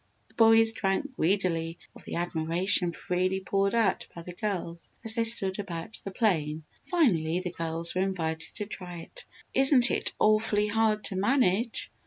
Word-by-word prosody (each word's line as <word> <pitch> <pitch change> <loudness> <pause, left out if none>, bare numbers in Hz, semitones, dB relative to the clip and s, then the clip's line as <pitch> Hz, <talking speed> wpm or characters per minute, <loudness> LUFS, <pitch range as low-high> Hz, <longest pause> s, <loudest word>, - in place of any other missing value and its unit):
The - - -25
boys 225 0 +5
drank 225 +6 -2
greedily 170 -3 0 0.2
of - - -15
the - - -5
admiration 175 +2 +1
freely 185 +3 -1
poured 195 +2 0
out 215 -5 +1
by 170 - -8
the 180 - -8
girls 175 -4 -3
as 225 -1 +1
they 230 0 +1
stood 205 -4 0
about 180 0 -4
the - - -5
plane. 160 -8 0 0.2
Finally, 180 - +2
the 180 -1 -4
girls 165 0 -3
were 185 - 0
invited 160 -4 -3
to 210 - -4
try 180 -4 -6
it. - - -11 0.3
"Isn't 270 -2 +5
it - - -1
awfully 215 -1 +2
hard 215 0 +1
to 195 - -2
manage?" 220 +1 +1
190 Hz, 165 wpm, -28 LUFS, 170-220 Hz, 0.3 s, boys